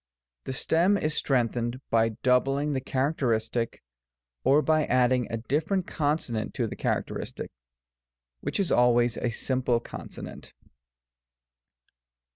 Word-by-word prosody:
The 130 Hz, -, -3 dB
stem 175 Hz, +9 st, +2 dB
is 155 Hz, -4 st, -1 dB
strengthened 120 Hz, -3 st, 0 dB
by 115 Hz, 0 st, +4 dB
doubling 135 Hz, +3 st, +2 dB
the 130 Hz, -, -1 dB
characteristic, 125 Hz, -5 st, -1 dB, 0.6 s
or 140 Hz, +4 st, +4 dB
by 155 Hz, +1 st, +3 dB
adding 125 Hz, 0 st, +2 dB
a 115 Hz, -, -1 dB
diflferent 155 Hz, -, -1 dB
consonant 145 Hz, -8 st, -2 dB
to 125 Hz, -, 0 dB
the 110 Hz, -, -5 dB
characteristic, -, -, -3 dB, 0.9 s
which -, -, -3 dB
is 195 Hz, -, 0 dB
always 120 Hz, -1 st, +4 dB
a 120 Hz, -, -1 dB
simple 125 Hz, 0 st, +1 dB
consonant. -, -, -9 dB
130 Hz, 110 wpm, -27 LUFS, 120-150 Hz, 0.9 s, by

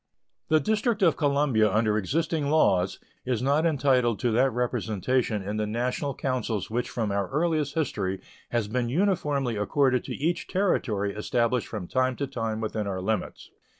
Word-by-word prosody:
The 155 Hz, -, +4 dB
District 215 Hz, -, 0 dB
of 165 Hz, -, +5 dB
Columbia 140 Hz, -8 st, +2 dB
under 110 Hz, +1 st, +2 dB
existing 150 Hz, -, 0 dB
laws 95 Hz, -, +3 dB, 0.3 s
is 125 Hz, -3 st, -1 dB
not 145 Hz, +5 st, +3 dB
entitled 130 Hz, -6 st, +2 dB
to 120 Hz, -, +1 dB
that 125 Hz, +4 st, +3 dB
representation 115 Hz, -2 st, -1 dB
in 105 Hz, +2 st, -3 dB
the 105 Hz, 0 st, -1 dB
national 125 Hz, +5 st, -2 dB
councils 120 Hz, -6 st, -2 dB
which 120 Hz, +2 st, -1 dB
from 110 Hz, -4 st, -2 dB
our 100 Hz, -1 st, -1 dB
earliest 155 Hz, -1 st, 0 dB
history 100 Hz, -, -1 dB, 0.3 s
has 115 Hz, -3 st, 0 dB
been 120 Hz, +2 st, -1 dB
uniformly 145 Hz, -, 0 dB
accorded 130 Hz, +4 st, +2 dB
to -, -, -4 dB
each 170 Hz, +4 st, -1 dB
Territory 110 Hz, -, 0 dB
established 120 Hz, +2 st, 0 dB
from 100 Hz, -6 st, -6 dB
time 130 Hz, +3 st, +1 dB
to 140 Hz, -, -2 dB
time 115 Hz, -5 st, -3 dB
within 110 Hz, -1 st, -2 dB
our 95 Hz, -2 st, -2 dB
limits. 105 Hz, +2 st, -3 dB
125 Hz, 160 wpm, -26 LUFS, 110-145 Hz, 0.3 s, of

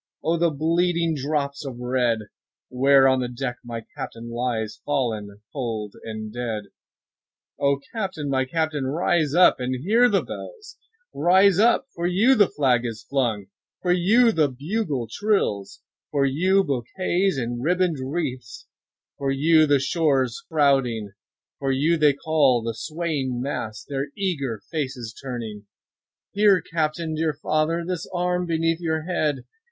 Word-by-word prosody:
5 -, -, -16 dB
O 165 Hz, +2 st, +2 dB
the 170 Hz, 0 st, +3 dB
bleeding 165 Hz, +2 st, +1 dB
drops 140 Hz, 0 st, -2 dB
of 135 Hz, -4 st, -6 dB
red! 125 Hz, -2 st, 0 dB, 0.5 s
Where 135 Hz, +1 st, +5 dB
on 130 Hz, 0 st, +3 dB
the 125 Hz, -, -1 dB
deck 125 Hz, 0 st, -4 dB
my 115 Hz, -2 st, -6 dB
Captain 115 Hz, +1 st, -7 dB
lies, 115 Hz, -3 st, -3 dB
Fallen 110 Hz, -8 st, -2 dB
cold 110 Hz, -6 st, -4 dB
and 110 Hz, -1 st, -6 dB
dead. 115 Hz, -3 st, -3 dB, 1.0 s
O 140 Hz, 0 st, +2 dB
Captain! 190 Hz, -9 st, -3 dB
my 130 Hz, -1 st, +1 dB
Captain! 155 Hz, -1 st, -1 dB
rise 155 Hz, 0 st, +1 dB
up 180 Hz, +1 st, +6 dB
and 130 Hz, +1 st, -3 dB
hear 230 Hz, +7 st, +4 dB
the -, -, +2 dB
bells; 450 Hz, -3 st, -9 dB, 0.3 s
Rise 190 Hz, +2 st, +4 dB
up—for 220 Hz, -5 st, +2 dB
you 200 Hz, +9 st, +4 dB
the 210 Hz, -6 st, +5 dB
flag 130 Hz, -5 st, +2 dB
is 115 Hz, -2 st, -5 dB
flung—for 120 Hz, -, -3 dB
you 215 Hz, +7 st, +4 dB
the 155 Hz, -8 st, +2 dB
bugle 145 Hz, -, -3 dB
trills, 115 Hz, -, -1 dB, 0.3 s
10 -, -, -72 dB
For 140 Hz, -2 st, +1 dB
you 185 Hz, +8 st, +3 dB
bouquets 175 Hz, -, -1 dB
and 120 Hz, -1 st, -3 dB
ribbon'd 180 Hz, -1 st, +1 dB
wreaths—for 130 Hz, -1 st, -6 dB
you 155 Hz, +3 st, +4 dB
the 145 Hz, -1 st, +4 dB
shores 135 Hz, -4 st, +1 dB
crowding, 135 Hz, -9 st, +2 dB, 0.5 s
For 135 Hz, -1 st, 0 dB
you 150 Hz, +6 st, +2 dB
they 150 Hz, -3 st, +4 dB
call, 140 Hz, -5 st, +2 dB
the 115 Hz, 0 st, -2 dB
swaying 150 Hz, -3 st, -3 dB
mass, 115 Hz, -5 st, -4 dB
their 140 Hz, 0 st, -3 dB
eager 140 Hz, -, -2 dB
faces 130 Hz, -8 st, -4 dB
turning; 115 Hz, -6 st, -6 dB, 0.6 s
Here, 205 Hz, -2 st, +4 dB
Captain! 160 Hz, 0 st, -2 dB
dear 155 Hz, 0 st, 0 dB
father! 155 Hz, +3 st, 0 dB
This 180 Hz, -2 st, -4 dB
arm 180 Hz, 0 st, -1 dB
beneath 165 Hz, 0 st, 0 dB
your 160 Hz, -2 st, -1 dB
head! 155 Hz, -6 st, -1 dB
145 Hz, 140 wpm, -24 LUFS, 125-170 Hz, 1.0 s, up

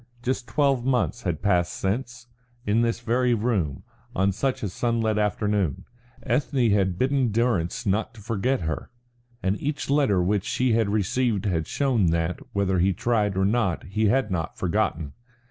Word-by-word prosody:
Just 125 Hz, 0 st, -2 dB
twelve 140 Hz, -4 st, +1 dB
months 125 Hz, -2 st, 0 dB
had 85 Hz, -6 st, -3 dB
passed 90 Hz, -4 st, +2 dB
since, 120 Hz, +4 st, -3 dB, 0.4 s
in 105 Hz, +3 st, +2 dB
this 115 Hz, 0 st, 0 dB
very 120 Hz, +1 st, +2 dB
room, 105 Hz, -, -1 dB, 0.3 s
on 95 Hz, +1 st, +2 dB
just 95 Hz, -, -4 dB
such 135 Hz, -4 st, -1 dB
a 100 Hz, -, -1 dB
sunlit 115 Hz, +1 st, 0 dB
afternoon, 105 Hz, -5 st, 0 dB, 0.4 s
Ethne 130 Hz, -2 st, +1 dB
had 95 Hz, -3 st, +1 dB
bidden 130 Hz, -1 st, +1 dB
Durrance 115 Hz, -4 st, 0 dB
try 105 Hz, 0 st, +1 dB
to 115 Hz, -, -14 dB
forget 115 Hz, +5 st, -1 dB
her, 80 Hz, -1 st, -3 dB, 0.5 s
and 95 Hz, +2 st, 0 dB
each 145 Hz, -1 st, -2 dB
letter 140 Hz, -10 st, +3 dB
which 100 Hz, +1 st, +1 dB
she 125 Hz, -2 st, +1 dB
had 110 Hz, -2 st, +2 dB
since 100 Hz, -, -2 dB
received 110 Hz, +1 st, 0 dB
had 85 Hz, -5 st, 0 dB
shown 125 Hz, -9 st, +1 dB
that, 85 Hz, +1 st, 0 dB
whether 95 Hz, -2 st, +1 dB
he 95 Hz, +2 st, +3 dB
tried 105 Hz, -1 st, 0 dB
or 95 Hz, -, +2 dB
not, 105 Hz, -4 st, +1 dB
he 110 Hz, +3 st, 0 dB
had 125 Hz, -1 st, +1 dB
not 85 Hz, -3 st, -3 dB
forgotten. 80 Hz, -4 st, -1 dB
105 Hz, 170 wpm, -25 LUFS, 95-120 Hz, 0.5 s, letter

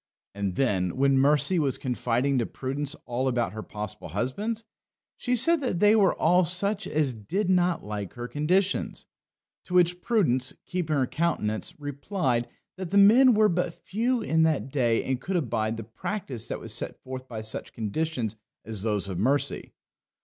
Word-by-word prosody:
And 100 Hz, -2 st, -3 dB
then, 95 Hz, -7 st, 0 dB
when 135 Hz, 0 st, +4 dB
Mercy 150 Hz, +6 st, +3 dB
was 140 Hz, -4 st, +1 dB
confiding 125 Hz, +1 st, 0 dB
to 115 Hz, -, -1 dB
Prudence 140 Hz, +3 st, -4 dB
all 125 Hz, +2 st, -1 dB
about 120 Hz, -6 st, 0 dB
her 110 Hz, -, -5 dB
possible 105 Hz, 0 st, -6 dB
husbands, 210 Hz, -, -2 dB, 0.5 s
she 250 Hz, -, 0 dB
said 320 Hz, +7 st, +3 dB
that 245 Hz, -10 st, -1 dB
they 210 Hz, +2 st, +6 dB
were 200 Hz, -4 st, +4 dB
all 180 Hz, +3 st, +4 dB
such 200 Hz, +4 st, +2 dB
as 150 Hz, -4 st, 0 dB
did 180 Hz, -, -1 dB
not 180 Hz, -1 st, +2 dB
like 105 Hz, -2 st, -5 dB
her 120 Hz, 0 st, -5 dB
conditions. 180 Hz, +9 st, 0 dB, 0.6 s
To 180 Hz, -, -4 dB
which 180 Hz, 0 st, +3 dB
Prudence, 130 Hz, -, +1 dB
keeping 175 Hz, -4 st, -1 dB
her 135 Hz, -2 st, +2 dB
countenance, 125 Hz, -, -2 dB
replied, 145 Hz, -3 st, -1 dB, 0.3 s
that 185 Hz, -2 st, -5 dB
the 200 Hz, -, +1 dB
men 235 Hz, +5 st, +7 dB
were 215 Hz, 0 st, +5 dB
but 175 Hz, -2 st, -1 dB
few 235 Hz, +4 st, -1 dB
in 160 Hz, -5 st, +2 dB
their 160 Hz, -3 st, +3 dB
day 125 Hz, -4 st, 0 dB
that 130 Hz, -1 st, -1 dB
could 190 Hz, -, -3 dB
abide 115 Hz, -8 st, -1 dB
the 115 Hz, -, -5 dB
practice 120 Hz, -, -5 dB
that -, -, -4 dB
was -, -, -5 dB
set -, -, -4 dB
forth 130 Hz, 0 st, -7 dB
by 110 Hz, -3 st, -6 dB
such 110 Hz, -, -4 dB
conditions 115 Hz, +1 st, -2 dB, 0.3 s
as 110 Hz, -3 st, -3 dB
those 105 Hz, -2 st, 0 dB
of 95 Hz, -3 st, -4 dB
Mercy. 135 Hz, +7 st, 0 dB
140 Hz, 170 wpm, -27 LUFS, 120-180 Hz, 0.6 s, men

